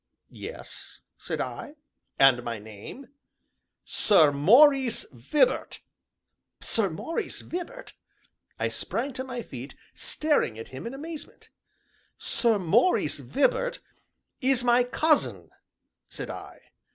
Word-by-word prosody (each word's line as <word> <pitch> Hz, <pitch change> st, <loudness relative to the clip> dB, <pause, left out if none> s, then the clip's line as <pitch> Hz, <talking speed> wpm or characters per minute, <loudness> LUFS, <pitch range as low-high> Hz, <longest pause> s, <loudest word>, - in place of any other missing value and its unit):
"Yes," -, -, -9 dB, 0.2 s
said -, -, -4 dB
I, 295 Hz, -, -5 dB, 0.4 s
"and 135 Hz, -3 st, +6 dB
my 120 Hz, -1 st, -4 dB
name?" 110 Hz, -, -11 dB, 0.8 s
"Sir 160 Hz, -8 st, +5 dB
Maurice 245 Hz, -, +5 dB
Vibart!" 140 Hz, -, 0 dB, 0.8 s
"Sir 215 Hz, -4 st, +2 dB
Maurice 250 Hz, -, -4 dB
Vibart?" 365 Hz, +9 st, -7 dB, 0.6 s
I -, -, 0 dB
sprang 265 Hz, +4 st, -3 dB
to 260 Hz, -, -4 dB
my 250 Hz, -2 st, -6 dB
feet, 130 Hz, -, -9 dB, 0.2 s
staring 295 Hz, -, 0 dB
at 115 Hz, -, -8 dB
him 130 Hz, +11 st, -7 dB
in 250 Hz, -, -6 dB
amazement. 315 Hz, +2 st, -9 dB, 0.7 s
"Sir 230 Hz, -3 st, +2 dB
Maurice 205 Hz, -, +2 dB
Vibart -, -, 0 dB, 0.6 s
is 260 Hz, -1 st, +2 dB
my 245 Hz, 0 st, +4 dB
cousin," 300 Hz, +5 st, 0 dB, 0.6 s
said -, -, -6 dB
I. -, -, -11 dB
245 Hz, 105 wpm, -27 LUFS, -, 0.8 s, and